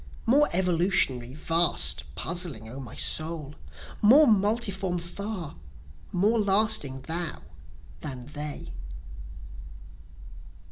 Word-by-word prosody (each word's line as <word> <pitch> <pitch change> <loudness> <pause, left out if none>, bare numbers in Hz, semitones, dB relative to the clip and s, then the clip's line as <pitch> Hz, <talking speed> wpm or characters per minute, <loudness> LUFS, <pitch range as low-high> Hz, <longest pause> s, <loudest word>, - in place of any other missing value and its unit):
More 285 +6 +4
evolutionary, 170 -8 +1
vast, 165 - 0
puzzling, 165 - -3
O 125 +5 -8
my 125 -5 -9
soul! 155 -2 +1 0.5
More 265 +9 +7
multiform 200 -4 +1
far 175 -1 -6 0.5
more 210 +6 +2
lasting 200 -9 +2
thou 165 +3 -4 0.6
than 130 -5 -7
they. 150 +1 -7
175 Hz, 85 wpm, -27 LUFS, 145-200 Hz, 0.6 s, More